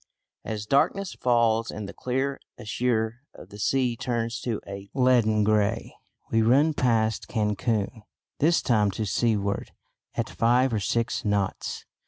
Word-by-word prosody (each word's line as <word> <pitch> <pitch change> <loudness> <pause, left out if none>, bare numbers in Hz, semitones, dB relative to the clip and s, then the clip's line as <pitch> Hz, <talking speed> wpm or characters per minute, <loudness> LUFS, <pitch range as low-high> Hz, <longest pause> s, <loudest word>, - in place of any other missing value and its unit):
As 105 -1 -4
darkness 180 - +1
falls 115 -2 +2
and 105 -2 -5
the - - -8
clear 135 +2 -2 0.2
azure 115 +1 -1
of - - -12
the 105 - -11
sea 125 +2 +1
turns 115 -1 -2
to 115 -4 -2
a 100 0 -8
leaden 120 -5 +3
grey, 110 +1 +1 0.4
we 115 - +3
run 140 +8 +4
past 110 -5 +1
Cancun, 105 0 -1 0.4
this 165 +3 +3
time 105 -4 +3
to 110 - -1
seaward, 100 -2 0 0.4
at - - -1
five 120 +2 +2
or 110 - +1
six 115 +3 -1
knots. 100 -2 -2
115 Hz, 140 wpm, -26 LUFS, 105-125 Hz, 0.4 s, run